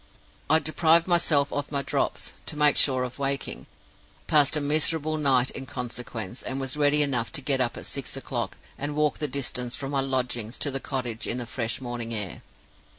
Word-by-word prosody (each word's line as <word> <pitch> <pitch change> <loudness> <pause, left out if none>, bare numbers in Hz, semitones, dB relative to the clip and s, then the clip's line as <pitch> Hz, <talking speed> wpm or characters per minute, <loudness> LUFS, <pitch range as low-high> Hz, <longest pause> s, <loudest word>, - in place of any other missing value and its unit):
I 160 - +7
deprived 160 +2 +3
myself 160 -5 +3
of 145 0 -3
my 140 -1 0
Drops, - - -2
to - - -3
make 150 -1 +5
sure 130 -2 +4
of 125 +2 -6
waking; 140 0 -2 0.6
passed 150 0 +4
a - - +1
miserable 155 +1 +3
night 130 -3 +3
in 135 - -6
consequence; 120 -3 -6
and 130 +1 -3
was 135 0 -1
ready 150 0 +4
enough 125 -5 -1
to 160 - +2
get 135 -1 +1
up 120 -2 0
at - - -8
six - - -3
o'clock, - - -4 0.2
and 145 +1 -3
walk 150 -1 +1
the 150 - 0
distance 125 -2 -1
from 135 0 -5
my 140 -1 +1
lodgings 125 -3 -1
to 145 - 0
the 135 - 0
cottage 125 -5 -3
in 120 - -1
the 125 - -4
fresh 115 0 -3
morning 120 -2 -4
air. 100 -4 -4
135 Hz, 195 wpm, -26 LUFS, 125-150 Hz, 0.6 s, I